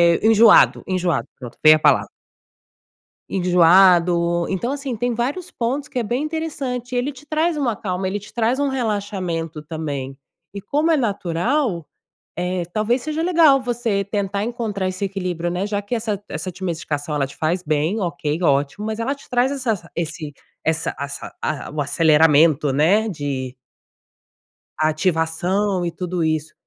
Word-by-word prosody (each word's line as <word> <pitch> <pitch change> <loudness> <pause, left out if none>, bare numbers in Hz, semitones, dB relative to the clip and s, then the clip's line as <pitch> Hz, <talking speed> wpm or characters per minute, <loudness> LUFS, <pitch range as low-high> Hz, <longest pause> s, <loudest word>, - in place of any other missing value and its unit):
eh, - - -2
enjoado 225 0 +6
enjoado, 180 -5 0
pronto, 125 -3 -10
veio 155 0 +9
a - - -9
palavra. - - +3 1.2
Enjoado. 175 -1 +4
Então, 215 +7 -2
assim, 280 -3 -4
tem 245 +2 -1
vários 275 +10 -3
pontos 265 +5 -2
que 285 - -7
é 245 - +1
bem 240 +6 -1
interessante 285 -6 -4
e - - 0
ele 250 +4 0
te 275 +1 -15
traz 315 +3 0
uma 260 -7 0
calma, 190 -2 -3
ele 200 +2 -2
te 205 - -14
traz 235 +3 +1
um 285 - +1
relaxamento 200 - -3
também. 145 -4 -5 0.4
E 200 - -6
como 300 +9 +1
é 320 - +4
natural, 200 - -1 0.5
eh, 180 +1 -1
talvez 230 +5 0
seja 310 +3 -2
legal 325 -6 +5
você 235 -5 -1
tentar 200 0 -2
encontrar 220 -5 -2
esse 185 +2 -4
equilíbrio, 180 -3 -3
né, 180 +3 -2
já 205 -1 -2
que 205 +4 -4
essa 215 -3 -3
essa 185 - -4
ti 185 +2 -14
medicação, 155 -4 -3
ela 140 -2 0
te 140 - -14
faz 170 +3 -1
bem, 155 +6 0
ok, 165 -3 -2
ótimo! 145 +6 +1
Mas 220 0 -3
ela 260 +5 -1
te 280 - -18
traz 250 +1 +2
essa 225 -11 -3
esse 160 -2 -4 0.3
essa 160 0 -1
assa 140 0 -7
a 155 -4 -3
o 150 - -3
aceleramento, 150 -1 +4
né, 185 +11 +3
de 140 -7 -4 1.2
ativação 175 +4 0
e 170 - -2
tudo 180 0 -3
isso. 155 -1 -1
190 Hz, 160 wpm, -21 LUFS, 160-240 Hz, 1.2 s, veio